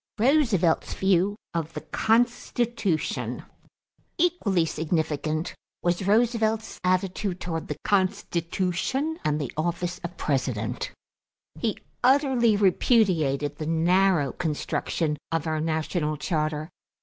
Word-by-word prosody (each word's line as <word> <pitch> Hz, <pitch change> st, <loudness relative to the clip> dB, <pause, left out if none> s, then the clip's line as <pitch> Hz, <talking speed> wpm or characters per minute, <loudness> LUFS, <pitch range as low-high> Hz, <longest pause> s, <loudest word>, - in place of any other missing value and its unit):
=Roosevelt's 225 Hz, -, +2 dB
View 190 Hz, +1 st, +2 dB, 0.2 s
of 165 Hz, -1 st, -3 dB
the -, -, -5 dB
Constitution.= 235 Hz, -5 st, 0 dB, 0.7 s
Equally 315 Hz, -, +2 dB
significant 155 Hz, 0 st, -1 dB, 0.3 s
was 175 Hz, +2 st, 0 dB
Roosevelt's 220 Hz, 0 st, +1 dB
attitude 185 Hz, +1 st, 0 dB
toward 165 Hz, -2 st, -4 dB
the 150 Hz, -, -3 dB
Constitution 190 Hz, -, 0 dB
and 150 Hz, 0 st, +1 dB
the 145 Hz, -, -3 dB
office 175 Hz, +2 st, -2 dB
of 170 Hz, -, -7 dB
President. 130 Hz, -6 st, -1 dB, 0.7 s
He -, -, -1 dB, 0.3 s
utterly 255 Hz, -4 st, +4 dB
repudiated 170 Hz, -, +2 dB
the 155 Hz, -, -4 dB
narrow 170 Hz, -1 st, +3 dB
construction 155 Hz, 0 st, -2 dB
of 165 Hz, -1 st, 0 dB
our 155 Hz, -1 st, -1 dB
national 155 Hz, -1 st, -1 dB
charter. 155 Hz, 0 st, -2 dB
175 Hz, 100 wpm, -26 LUFS, 155-215 Hz, 0.7 s, utterly